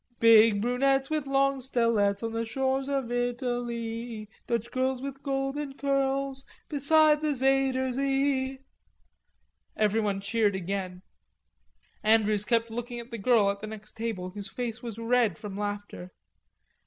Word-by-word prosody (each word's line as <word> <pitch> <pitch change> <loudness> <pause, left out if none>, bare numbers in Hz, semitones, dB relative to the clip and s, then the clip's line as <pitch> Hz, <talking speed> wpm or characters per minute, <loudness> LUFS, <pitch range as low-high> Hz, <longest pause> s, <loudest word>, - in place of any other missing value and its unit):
"Big 225 -2 +6
brunettes 270 +3 +1
with 305 -3 -1
long 275 0 +2
stelets 230 -5 +1
On 225 - -2
the 225 0 -2
shores 265 +3 -1
of 270 -4 -1
Italee, 240 -2 -3 0.2
Dutch 235 -1 -2
girls 260 0 0
with 275 +1 -7
golden 275 +1 -2
curls 275 -1 0 0.3
Beside 300 +1 +4
the 300 -2 0
Zuyder 265 0 +2
Zee..." 270 0 0 1.2
Everybody 210 -2 +1
cheered 205 0 +1
again; 185 0 -4 1.0
Andrews 215 -1 +3
kept 230 -1 +1
looking 240 +1 -5
at 235 +1 -10
the 230 - -5
girl 210 -2 +4
at 200 - -7
the 215 - -6
next 215 -1 -9
table, 220 -5 -4
whose 200 +1 -7
face 235 -2 -4
was 230 -3 -7
red 230 0 +1
from 205 -2 -7
laughter. 205 -3 -5
240 Hz, 135 wpm, -28 LUFS, 215-270 Hz, 1.2 s, Big